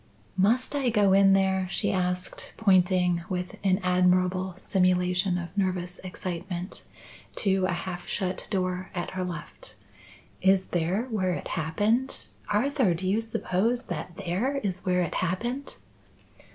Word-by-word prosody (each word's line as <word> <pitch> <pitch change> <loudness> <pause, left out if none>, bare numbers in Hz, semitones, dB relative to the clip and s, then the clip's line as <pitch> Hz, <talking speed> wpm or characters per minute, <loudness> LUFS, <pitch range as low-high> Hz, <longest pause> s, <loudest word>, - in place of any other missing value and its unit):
"Must 225 +9 +2
I 270 -3 +1
go 205 -4 +4
in 195 0 +6
there?" 190 -1 +2
she - - 0
asked, 180 -1 -2
pointing, 180 -4 +3
with 180 -1 -3
an 190 -1 +3
admirable 180 0 +2
simulation 180 0 +2
of 170 0 -6
nervous 185 -2 -1
excitement, 180 0 -5 0.5
to 190 -2 +1
a - - -1
half 175 0 -5
shut 185 -2 -2
door 185 -2 -1
at 175 - -3
her 185 -1 -3
left. 175 -4 -7 0.7
"Is 190 0 +4
there 175 +5 0
where 185 -4 +1
it - - -6
happened? 165 - 0 0.2
Arthur, 245 - +2
do 185 +3 -3
you 205 +4 +2
suppose 225 +1 0
that 175 - -6
there 200 +9 -1
is 185 -3 -2
where 180 0 +3
it 170 - -3
happened?" 240 +10 -2
185 Hz, 140 wpm, -27 LUFS, 180-200 Hz, 0.7 s, in